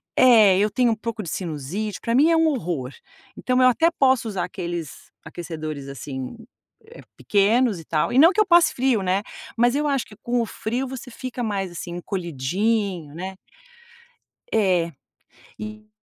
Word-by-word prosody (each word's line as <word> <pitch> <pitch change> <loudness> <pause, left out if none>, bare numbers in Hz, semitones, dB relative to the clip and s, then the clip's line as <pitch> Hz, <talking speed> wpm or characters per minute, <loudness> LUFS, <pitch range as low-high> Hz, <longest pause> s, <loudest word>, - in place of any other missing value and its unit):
é, 220 -7 +6
eu 210 - +3
tenho 240 +3 +2
um 225 - +1
pouco 225 -1 -5
de 165 - -6
sinusite, 180 +6 -4
para 230 - -1
mim 300 +5 +5
é - - +4
um 325 - +4
horror. 170 - -2 0.5
Então, 255 0 +1
eu 255 - +7
até 325 +7 +3
posso 260 -7 +2
usar 195 -4 -2
aqueles 175 -5 -6 0.2
aquecedores 155 -4 -6
assim, 135 - -6 0.8
pequenos 215 +1 +2
e 165 - -12
tal, 155 0 0
e 255 - +4
não 330 +5 +8
que 430 - +3
eu - - +3
passe 345 -2 +5
frio, 250 -4 +1
né, 190 +2 0 0.3
mas 240 +1 +3
eu 295 +1 0
acho 275 -3 0
que 210 - -15
com 240 0 0
o - - -1
frio 240 +4 -3
você 255 -1 -8
fica 255 +1 -6
mais 195 -4 -2
assim 175 0 -7
encolhidinho, 180 - -2
né. 190 +2 -6 1.2
É, 180 -5 +2 0.7
e 215 0 -8
210 Hz, 170 wpm, -23 LUFS, 175-245 Hz, 1.2 s, não